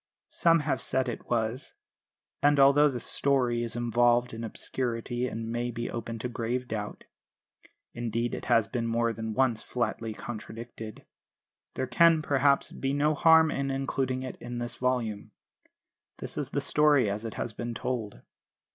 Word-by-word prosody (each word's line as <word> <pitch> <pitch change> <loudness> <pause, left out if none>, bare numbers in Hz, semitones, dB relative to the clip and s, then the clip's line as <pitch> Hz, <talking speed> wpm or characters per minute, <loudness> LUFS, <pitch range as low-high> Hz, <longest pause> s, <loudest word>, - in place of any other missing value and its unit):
Some 165 -1 +3
have 150 -1 -1
said 130 0 0
it 120 - -6
was; 115 +2 -2 0.7
and 145 0 +4
although 140 +2 +6
the 125 -3 -4
story 125 -3 +1
is 115 -1 -2
involved 120 0 +2
in 115 +1 -6
obscurity 120 +1 -3
and 115 -1 -5
may 120 +1 -1
be 120 0 -4
open 115 0 -5
to 115 - -3
grave 120 +1 -3
doubt 105 -2 -5 0.9
(indeed 120 0 -2
it - - -5
has 115 -2 +3
been 120 -2 -2
more 115 0 +1
than 110 0 -5
once 130 -4 +2
flatly 115 -2 -3
contradicted) 115 -1 -8 0.7
there 130 - -1
can, 165 +3 +4
perhaps, 140 -1 +2
be 135 0 -2
no 150 +2 +2
harm 160 +1 +6
in 135 0 -2
including 135 -1 -1
it 130 - -6
in 120 0 -7
this 120 0 -3
volume. 120 -5 -2 0.8
This - - -6
is - - -3
the - - -1
story 145 -5 +4
as 100 +2 -2
it 115 - -5
has 115 - -3
been 120 +1 -5
told. 115 -5 -4
120 Hz, 160 wpm, -28 LUFS, 115-135 Hz, 0.9 s, although